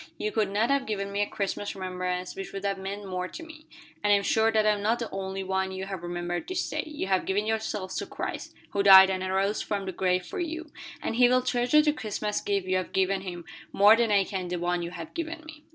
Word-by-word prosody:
"You 215 Hz, -, -2 dB
could 215 Hz, -3 st, +1 dB
not 215 Hz, +6 st, +1 dB
have 280 Hz, -1 st, +1 dB
given 200 Hz, -2 st, -3 dB
me 200 Hz, +1 st, -1 dB
a 205 Hz, -, +1 dB
Christmas 200 Hz, 0 st, -3 dB
remembrance 180 Hz, -1 st, -3 dB
which 195 Hz, -, -7 dB
would 195 Hz, 0 st, -5 dB
have 195 Hz, -1 st, -1 dB
meant 200 Hz, +2 st, -5 dB
more 185 Hz, -1 st, -3 dB
to 330 Hz, -, -9 dB
me. 315 Hz, -1 st, -13 dB, 0.4 s
And 205 Hz, -, +3 dB
I -, -, +7 dB
am 200 Hz, -, +1 dB
sure 220 Hz, +2 st, +3 dB
that 215 Hz, -1 st, +2 dB
I 215 Hz, -, +5 dB
am 205 Hz, -1 st, -1 dB
not 220 Hz, +3 st, +2 dB
the 235 Hz, -, -5 dB
only 195 Hz, 0 st, -4 dB
one 190 Hz, 0 st, -1 dB
you 190 Hz, 0 st, -5 dB
have 195 Hz, -2 st, -6 dB
remembered 175 Hz, -, -4 dB
this 370 Hz, -1 st, -2 dB
day -, -, -2 dB
you 300 Hz, -9 st, -4 dB
have 190 Hz, -1 st, +1 dB
given 205 Hz, +2 st, +1 dB
yourselves 220 Hz, -3 st, -2 dB
to -, -, -3 dB
Christ, -, -, -5 dB, 0.2 s
who 200 Hz, -, +1 dB
died 190 Hz, -1 st, +9 dB
and 185 Hz, -1 st, -2 dB
arose 195 Hz, +2 st, 0 dB
from 200 Hz, -2 st, -3 dB
the 190 Hz, -, -3 dB
grave 180 Hz, 0 st, 0 dB
for -, -, -6 dB
you, 325 Hz, -2 st, -4 dB, 0.3 s
and 225 Hz, -, -2 dB
He 245 Hz, -1 st, +6 dB
will 255 Hz, 0 st, +3 dB
treasure 250 Hz, +4 st, +3 dB
the 300 Hz, -1 st, +2 dB
Christmas 210 Hz, -5 st, -3 dB
gift 200 Hz, -2 st, -1 dB
you 185 Hz, 0 st, +1 dB
have 185 Hz, -, -4 dB
given 190 Hz, 0 st, +1 dB
Him 175 Hz, -3 st, -7 dB, 0.3 s
more 205 Hz, +2 st, +7 dB
than 230 Hz, -1 st, +1 dB
I 200 Hz, -1 st, +5 dB
can 190 Hz, -2 st, -4 dB
the 180 Hz, -, -3 dB
one 175 Hz, 0 st, -1 dB
you 170 Hz, -, -4 dB
have 175 Hz, -2 st, -8 dB
given 330 Hz, -1 st, -5 dB
me." 315 Hz, -1 st, -11 dB
200 Hz, 260 wpm, -27 LUFS, 190-225 Hz, 0.4 s, died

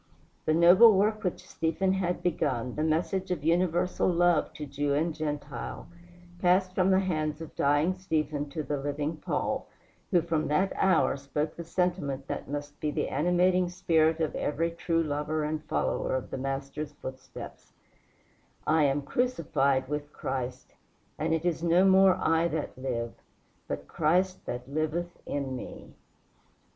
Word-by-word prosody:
The 155 Hz, -, +2 dB
noble 185 Hz, +7 st, +8 dB
work 215 Hz, +2 st, +1 dB
which 180 Hz, -, -3 dB
Stephen 165 Hz, +4 st, 0 dB
had 180 Hz, -2 st, -1 dB
begun, 135 Hz, -8 st, 0 dB
the 150 Hz, -, -3 dB
message 165 Hz, +4 st, 0 dB
of 175 Hz, -5 st, -2 dB
universal 175 Hz, +2 st, +2 dB
love 175 Hz, -1 st, +3 dB
to 150 Hz, -, -6 dB
Jew 140 Hz, 0 st, -1 dB
and 160 Hz, +3 st, 0 dB
Gentile, 145 Hz, -4 st, -5 dB, 0.5 s
passed 185 Hz, +1 st, +3 dB
from 185 Hz, 0 st, +2 dB
the 190 Hz, 0 st, +4 dB
hands 155 Hz, -5 st, -1 dB
of 160 Hz, -2 st, -8 dB
dying 145 Hz, +5 st, +2 dB
Stephen 155 Hz, -5 st, -2 dB
to 155 Hz, 0 st, -4 dB
the 145 Hz, 0 st, -2 dB
living 145 Hz, +3 st, -3 dB
Paul, -, -, -2 dB, 0.4 s
who 175 Hz, -4 st, +3 dB
from 165 Hz, -2 st, 0 dB
that 185 Hz, +6 st, +1 dB
hour 185 Hz, -7 st, +3 dB
spoke 150 Hz, +3 st, -3 dB
the 170 Hz, -, -6 dB
sentiment 165 Hz, -6 st, -1 dB
that -, -, -5 dB
must 145 Hz, 0 st, -5 dB
be 150 Hz, -, -1 dB
the -, -, -1 dB
animating 180 Hz, +4 st, +2 dB
spirit 165 Hz, -3 st, +2 dB
of 160 Hz, -2 st, 0 dB
every 165 Hz, +3 st, -1 dB
true 165 Hz, 0 st, 0 dB
lover 150 Hz, +1 st, -1 dB
and 155 Hz, +1 st, -2 dB
follower -, -, -1 dB
of 130 Hz, -, -4 dB
the -, -, -3 dB
Master's 135 Hz, +2 st, -4 dB
footsteps: 130 Hz, -2 st, -9 dB, 0.9 s
"I 155 Hz, 0 st, +4 dB
am 140 Hz, +1 st, +1 dB
crucified 140 Hz, -, +1 dB
with 150 Hz, +1 st, -4 dB
Christ; 125 Hz, -2 st, -5 dB, 0.5 s
and 155 Hz, -, 0 dB
now 165 Hz, -, +3 dB
it 165 Hz, +1 st, -3 dB
is 170 Hz, -2 st, 0 dB
no 170 Hz, +2 st, +4 dB
more 190 Hz, -1 st, +6 dB
I 165 Hz, +1 st, +2 dB
that 160 Hz, -2 st, -3 dB
live, 120 Hz, -3 st, -3 dB, 0.5 s
but 70 Hz, -, -5 dB
Christ 180 Hz, +4 st, +1 dB
that 125 Hz, +1 st, -4 dB
liveth 155 Hz, +4 st, -2 dB
in 135 Hz, -2 st, -2 dB
me." 125 Hz, -, -9 dB
155 Hz, 155 wpm, -28 LUFS, 145-175 Hz, 0.9 s, noble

